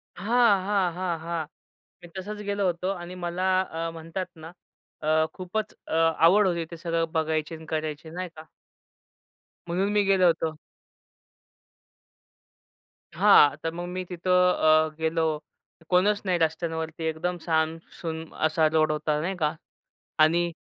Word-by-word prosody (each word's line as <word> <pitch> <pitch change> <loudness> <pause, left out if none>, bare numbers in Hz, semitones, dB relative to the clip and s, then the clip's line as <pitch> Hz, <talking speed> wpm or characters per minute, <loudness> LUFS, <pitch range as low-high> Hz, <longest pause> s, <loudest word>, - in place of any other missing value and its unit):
हां, 205 0 +3
हां, 195 -4 +1
हां, 175 -3 -2
हां. 165 -1 -3 0.6
मी - - -10
तसच 210 +2 -6
गेलो 200 -1 0
होतो 180 +1 -1
आणि 175 0 -8
मला 175 +1 -3 0.2
अ, 165 -2 -4
म्हणतात 165 +3 -5
ना, 160 +1 -10 0.5
अ, 155 +1 +3
खूपच 215 +4 -4
अ, - - -2
आवड 165 +5 +4
होती 170 -2 -1
ते 170 - -7
सगळं 165 -1 -1
बघायची 160 0 -1
अन् 160 0 -11
करायची 155 0 -3
नाही 180 +2 -5
का. 155 +1 -11 1.2
म्हणून 190 +4 0
मी 205 -1 +3
गेलो 195 -2 +3
होतो. 165 -1 +1 2.6
हां. 145 -1 +6
तर 165 - -1
मग 175 +1 -5
मी 185 +1 -4
तिथं 180 +1 +3
अ, 155 0 +4
गेलो. 160 0 0 0.7
कोणच 200 +3 +3
नाही 180 -2 +2
रस्त्यांवरती, 160 0 -2
एकदम 170 +3 -2
साम 160 -1 +1 0.2
सुम 160 -1 -4 0.2
असा 155 0 +3
रोड 155 -1 +3
होता 150 0 -1
नाही 190 +3 -2
का 155 -2 0 0.7
आणि 170 +2 +3
170 Hz, 140 wpm, -26 LUFS, 160-185 Hz, 2.6 s, हां